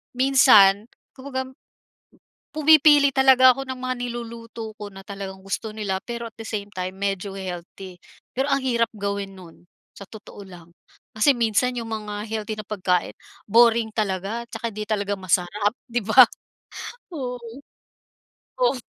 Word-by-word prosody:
minsan 245 -7 +6 0.3
kumbaga 260 -1 -5 1.1
pumipili 300 -2 +6
talaga 265 -1 +6
ako 270 - -5
ng 260 -1 -5
mga 255 0 -2
niluluto 230 -2 -7
ko 205 -1 -8
na 195 - -10
talagang 195 -1 -8
gusto 215 +2 -4
nila 200 -3 -2
pero 235 -1 -5
at 220 - -37
the 225 - -7
same 205 -2 -4
time 185 0 -4
medyo 195 0 -3
healthy. 185 0 -8 0.4
Pero 275 +2 0
ang 275 - +1
hirap 235 -3 +1
gawin 200 -1 -4
no'n 175 -2 -15 0.3
sa 200 - -9
totoo 215 -1 -12
lang 175 -2 -14 0.5
kasi 220 +6 +4
minsan 240 +2 +1
'yong 230 -1 -4
mga 210 -1 -5
healthy 215 0 -4
na - - -5
pagkain 180 -4 0 0.4
boring 230 0 +4
talaga 205 +2 -2
'tsaka 230 +1 -4
'di 210 +1 -5
talaga 205 -1 -1
masarap, 190 +3 0
'di 240 0 -1
ba? 255 +4 +9 0.9
Oo. 250 -4 -4 1.2
Of. - - +3
220 Hz, 145 wpm, -23 LUFS, 195-245 Hz, 1.2 s, ba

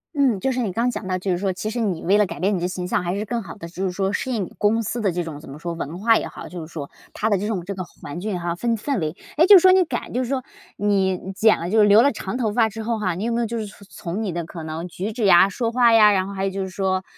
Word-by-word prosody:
嗯， 265 -8 +2
就 265 - 0
是 255 - -2
你 220 -6 -1
刚 235 +6 0
讲 195 - -6
到， 185 -1 0
就 185 +1 -2
是 175 - 0
说 195 0 0
其 185 +4 -4
实 240 - -3
你 190 -7 -1
为 200 +4 +3
了 210 - +4
改 - - -7
变 195 +3 +1
你 - - -1
的 175 - -1
形 180 -1 -4
象， 180 - 0
还 175 +2 -2
是 210 - -3
更 235 +1 -2
好 185 0 -9
地 170 -5 -9
就 180 +3 -6
是 185 - 0
说 195 +2 -1
适 260 - -2
应 215 -5 -1
你 - - -13
公 220 +2 +2
司 230 +3 -3
的 200 -4 +1
这 175 0 -2
种， 155 -3 -7
怎 150 - -13
么 140 - -8
说， 170 +2 -5
文 165 +1 -6
化 225 +1 +4
也 - - -3
好 - - -9
就 175 -2 -7
是 155 - -10
说。 145 -4 -6 0.2
它 220 - -1
的 200 - +4
这 205 - -2
种 195 -6 -2
这 200 - -4
个 185 - -5
环 170 -2 -9
境 195 -1 -3
哈 170 0 -2
氛 230 +5 0
氛 265 +2 -2
围， 155 0 -3 0.2
诶， 330 - +6
就 410 - +10
说 370 +1 +6
你 375 0 +5
改 245 -6 -4
就 255 +2 0
是 245 - -5
说 265 -2 -1 0.3
你 190 -2 0
剪 220 +1 +4
了 170 - -4
就 220 0 +4
留 205 +2 +7
了 285 - +4
长 210 +1 -5
头 225 -4 0
发 225 -1 +3
之 220 +1 -7
后 230 0 -1
哈， 185 -4 -1
你 190 - -4
有 235 - -1
没 235 - 0
有 235 - +1
就 235 - -4
是 220 - -3
从 200 -1 -14 0.3
从 220 +4 -2
你 195 - -2
的 170 0 -3
可 165 0 -8
能 160 +2 -5
举 190 +5 -5
止 225 -1 -2
呀、 190 0 +7
说 230 +3 -2
话 240 -1 +4
呀， 210 -2 +7
然 190 -1 +1
后 200 - -7
还 195 0 -2
有 195 - -1
就 195 0 -4
是 190 - -3
说， 185 -1 -1
200 Hz, 365 characters per minute, -22 LUFS, 180-225 Hz, 0.3 s, 就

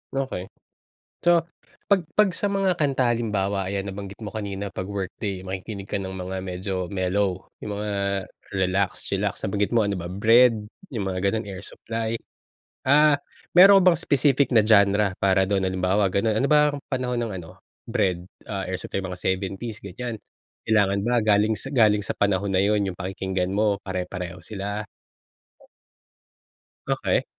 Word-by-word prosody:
Okey. 130 -9 -3 0.7
So, 175 -1 +4 0.4
'pag 200 -2 +3 0.2
'pag 210 -2 +6
sa 200 +4 -1
mga 195 -2 +2
kanta 135 -6 +1
halimbawa, 100 -4 -1
ayan, 100 0 -2
nabanggit 100 0 -7
mo 105 - -7
kanina, 100 -2 -4
'pag 95 0 -5
workday 95 -1 -4
makikinig 95 +1 -6
ka 100 - -3
ng 95 - -5
mga 95 +1 -4
medyo 95 0 -4
mellow, 95 0 -1 0.2
yung 105 -1 -4
mga 105 0 -3 0.6
relax, 95 0 0
chilax, - - -2
nabanggit 100 +1 0
mo, 115 -3 +2
ano 100 - 0
ba, 85 - -6
Bred, 110 +3 +4 0.2
yung 110 -7 -3
mga 95 +1 0
gano'n, 110 +1 -2
Air 95 -2 -7
Supply. 115 +2 -4 0.7
Ah, 150 +2 +5 0.4
meron 195 +2 +9
ka - - +1
bang - - -5
specific 140 -1 +3
na 115 - +6
genre 100 -2 +4
para 95 0 +3
do'n, 100 -1 +1
halimbawa, 95 +1 +1
gano'n, 105 +3 +1
ano - - +3
ba 150 - +7 0.2
ang 140 - -9
panahon 125 -1 -1
ng 115 - -4
ano, 80 -1 -10 0.4
Bred, 90 -1 0 0.2
ah, 100 -2 -4
Air 95 - -2
Supply, 95 - -4
mga 95 -1 -5
70s 95 +4 -2
ganiyan, 110 +4 -6 0.5
kailangan 100 -2 +3
ba 120 -2 +2
galing 105 +1 +3 0.2
galing 105 -6 +4
sa - - -2
panahon 100 0 0
na 95 - +2
yun 100 0 +2
yung 90 - -12
pakikinggan 95 0 -2
mo, 105 -1 +2
pare-pareho 90 -1 -5
sila? 105 0 -4 2.0
Okey. - - +1
100 Hz, 160 wpm, -24 LUFS, 95-115 Hz, 2.0 s, meron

